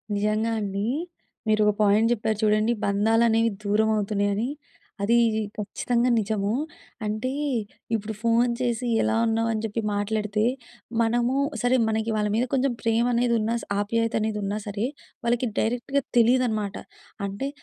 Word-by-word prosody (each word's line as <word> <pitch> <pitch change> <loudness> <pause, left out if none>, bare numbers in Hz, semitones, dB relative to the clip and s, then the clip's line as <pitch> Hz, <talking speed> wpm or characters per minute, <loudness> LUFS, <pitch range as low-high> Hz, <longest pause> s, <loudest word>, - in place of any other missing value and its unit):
నిజంగా 215 +2 0
అండీ. 200 0 -2 0.6
మీరు 215 0 +4
ఓ - - -7
పాయింట్ 210 +3 +4
చెప్పారు 220 -1 -1
చూడండి. 215 +2 +3
బంధాలనేవి 225 +3 +3
దూరమవుతున్నయని, 210 +1 +1 0.5
అదీ 230 +4 +4 0.4
ఖచ్చితంగా 235 +4 0
నిజము. 205 -1 -1 0.5
అంటే, 215 +5 -2 0.6
ఇప్పుడు 220 0 -3
ఫోన్ 235 +1 +3
చేసి 245 0 -1
ఎలా - - +1
ఉన్నావు 225 0 +1
అని 215 - -2
చెప్పి 225 +1 -2
మాట్లాడితే, 210 +1 -1 0.6
మనమూ 240 +2 +1 0.3
సరే 245 +1 +3
మనకి 220 +1 0
వాళ్ళ 210 -1 0
మీద 245 - +2
కొంచం 270 0 +2
ప్రేమనేది 235 +1 +2
ఉన్నా 220 +2 0
స - - -9
ఆప్యాయతనేది 220 0 0
ఉన్నా 200 +1 -2
సరే, 205 +1 -2 0.4
వాళ్ళకి 240 +1 +1
డైరెక్ట్‌గా 245 +5 0 0.2
తెలీదనమాట. 230 -4 +2 0.5
అంటే, 200 +8 -3
220 Hz, 125 wpm, -25 LUFS, 210-235 Hz, 0.6 s, మీరు